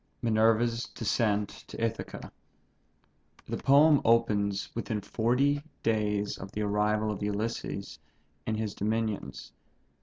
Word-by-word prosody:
MINERVA'S 115 +1 +2
DESCENT 105 -2 +1 0.2
TO - - -9
ITHACA. 115 0 -4 1.2
The - - -3
poem 145 +2 +5
opens 105 -4 +2
within 115 -2 -2
forty 125 +7 +1
eight 150 +2 -16
days 105 -2 0
of 95 +1 -8
the 105 - -2
arrival 105 +1 +1
of 105 - -5
Ulysses 105 -4 -3 0.5
in 110 - 0
his 110 -2 -2
dominions. 110 - -2
110 Hz, 115 wpm, -29 LUFS, 105-115 Hz, 1.2 s, poem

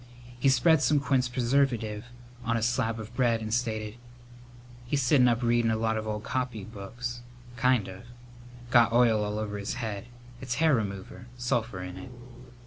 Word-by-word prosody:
He 135 - +4
spread 135 +4 +4
some 150 -1 +3
quince 135 -3 +1
preserve 130 +3 +2 0.7
on 115 0 0
a 110 - -2
slab 115 -1 0
of 110 +2 -9
bread 120 -3 +2
and 110 0 -4
stated, 110 -2 -2 0.9
"He's 135 +3 -1
sittin' 125 0 +5
up 120 0 +1
readin' 120 -1 +3
a 110 - +1
lot 110 0 0
of 110 0 -3
old 105 0 -3
copybooks, 120 0 -4 0.3
kind 125 -3 +2
of. 95 0 -9 0.7
Got 120 -2 +5
oil 115 -3 +4
all 105 0 -2
over 105 -1 -3
his 100 - -3
head. 110 -3 -4 0.3
It's 125 -2 -3
hair 155 +2 +3
remover. 100 0 -3
Sulphur 120 -6 -1
in 90 0 -7
it." 95 - -9
115 Hz, 165 wpm, -28 LUFS, 110-125 Hz, 0.9 s, sittin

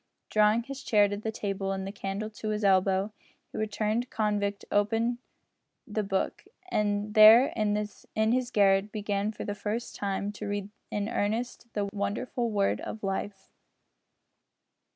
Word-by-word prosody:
Drawing 215 +2 +4
his 275 +2 -7
chair 205 -2 +4
to 205 - -3
the 215 +2 -3
table 195 -3 -3
and 190 0 -3
the 195 - -4
candle 200 +1 -4
to 215 0 -5
his 210 0 -1
elbow, 195 +1 +3 0.4
the - - -5
returned 215 +3 -1
convict 205 -2 -1
opened 225 +4 +1 0.7
the 215 -3 -2
Book, 195 -1 -2 0.3
and 210 - 0
there 220 +5 +8
in 210 +1 -1
his 250 0 +1
garret 200 -1 +3
began 205 -1 -1
for 215 - -7
the 205 - -2
first 210 +3 -4
time 200 0 -2
to 210 0 -7
read 205 0 -3 0.2
in 205 0 -2
earnest 225 +4 -2
the 205 -1 0
wonderful 230 +4 -2
Word 200 -2 +1
of 215 - -7
Life! 195 0 -4
210 Hz, 150 wpm, -29 LUFS, 200-220 Hz, 0.7 s, there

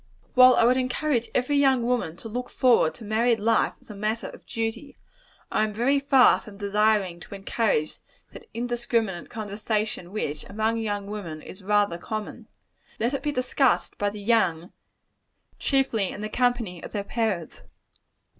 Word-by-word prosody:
While 255 0 +8
I - - +4
would 250 +2 +4
encourage 255 -1 0
every 255 +3 +2
young 265 -3 +4
woman 235 -9 -1
to 225 - -8
look 245 +3 -4
forward 240 -11 +3
to 230 - -11
married 225 +2 +2
life 225 +1 +2
as - - -14
a - - -9
matter 215 +3 -2
of - - -14
duty, 230 +5 -4 0.5
I - - +2
am 215 -1 -2
very 270 +5 +2
far 275 -2 +5
from 205 -2 -12
desiring 205 -3 +1
to 200 - -10
encourage 195 -5 -1 0.3
that 450 - -12
indiscriminate 235 -5 -2
conversation, 210 -3 -3
which, 150 -8 -3
among 220 +2 -1
young 205 -3 -2
women, 185 -7 -6
is 185 - -11
rather 205 -3 +1
common. 215 +3 -6 0.5
Let 235 +4 0
it 275 - -2
be 295 - -1
discussed 255 0 +1
by 205 - +1
the 210 +1 -8
young, 190 -6 +1 0.9
chiefly 265 -8 +1
in 205 - -7
the 215 - -4
company 240 -9 0
of - - -9
their 205 -2 -2
parents. 200 -6 -2
220 Hz, 165 wpm, -25 LUFS, 205-245 Hz, 0.9 s, While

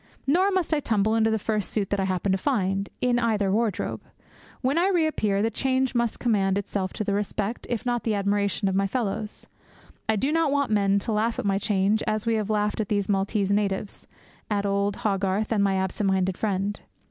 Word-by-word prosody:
Nor 360 +8 +3
must 370 -4 0
I 305 - +3
tumble 220 -5 +1
into 225 0 +3
the 220 - +1
first 215 -1 -1
suit 205 -3 -2
that 200 - +1
I 190 - +1
happen 185 +1 0
to 190 - +2
find 195 -6 0
in 245 -1 +2
either 215 -4 +1
wardrobe. 215 -1 -1 0.6
When 275 +5 +1
I 360 - +3
reappear, 310 - +1
the 225 - +1
change 265 0 0
must 235 -2 0
commend 200 -5 +1
itself 195 -1 -2
to - - -2
the 200 - -1
respect, 210 +2 -2
if 240 0 -2
not 240 -2 0
the 220 -2 0
admiration, 200 0 0
of 190 - 0
my 195 +1 +2
fellows. 215 -1 -3 0.6
I 220 - +4
do 265 +8 0
not 325 -2 +2
want 280 -4 +1
men 200 -1 +3
to 200 - -2
laugh 220 +2 0
at - - -3
my 195 -1 +1
change 205 +1 +1
as 215 0 -1
we 230 - +2
have 215 -2 -1
laughed 210 0 0
at 210 - -4
these 205 -1 0
Maltese 200 0 +1
natives, 200 -1 -1 0.4
at 205 -1 0
old 200 0 0
Hogarth, 195 +1 0
and 215 -3 +2
at - - +4
my 195 -1 +1
absent 190 +2 0
minded 190 -1 +1
friend. 200 0 -1
210 Hz, 215 wpm, -25 LUFS, 195-230 Hz, 0.6 s, I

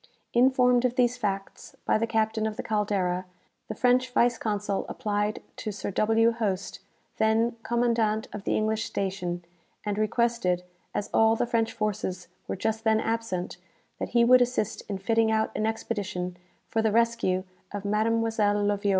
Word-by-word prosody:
"Informed 250 0 +4
of 250 -1 +1
these 250 -1 +3
facts 195 -5 -4
by - - +3
the 230 - 0
captain 220 -1 0
of 215 - -5
the - - -3
'Caldera,' 195 -4 0 0.4
the - - -5
French 255 +1 +3
vice 240 -2 +2
consul 205 -2 -1
applied 210 0 -2
to 215 - -4
Sir 205 0 -4
W. 225 +3 +3
Hoste, 195 -4 -2 0.4
then 225 +2 +2
commandant 230 -2 +1
of 210 - -6
the - - 0
English 215 +1 0
station, 180 -3 -3 0.4
and 205 0 -1
requested, 215 -5 +1 0.3
as 205 - -2
all 225 0 +5
the 235 - 0
French 230 -1 0
forces 195 -4 -3 0.2
were - - -2
just 220 +3 -2
then 220 -1 +3
absent, 225 -7 -2 0.4
that - - -3
he 235 -1 +4
would 255 +1 +7
assist 240 -3 0
in 200 - -2
fitting 225 +3 +2
out 220 0 +1
an 215 - 0
expedition 205 -5 -3 0.3
for 225 - 0
the 220 -1 +2
rescue 230 -5 +2 0.3
of 205 0 -5
Mademoiselle 220 0 +1
Loviot. 205 0 +1
220 Hz, 160 wpm, -27 LUFS, 205-230 Hz, 0.4 s, would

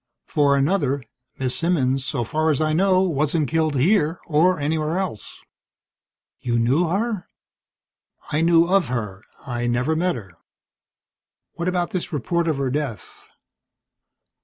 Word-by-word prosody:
For 140 -2 +2
another, 140 -3 +1 0.3
Miss 130 -1 -1
Simmons, 135 -6 +1
so 120 - -2
far 155 +7 0
as 150 - +1
I 155 0 +1
know, 185 +2 +3
wasn't 155 -2 0
killed 155 +1 0
here 165 +3 +2
or 170 +3 +3
anywhere 155 +3 -1
else." 185 - -4 1.0
"You 120 -1 -1
knew 130 +9 +2
her?" 205 +2 -2 1.0
"I 150 - +1
knew 165 0 +5
of 185 -3 +2
her. 105 -6 -4 0.2
I 120 -2 -2
never 125 +6 +1
met 180 +1 +1
her." 100 -7 -9 1.2
"What 170 +1 -4
about 180 -1 0
this 185 - -3
report 170 +4 -1
of 155 -3 0
her 135 -2 -1
death?" 140 -6 -4
155 Hz, 135 wpm, -22 LUFS, 130-175 Hz, 1.2 s, knew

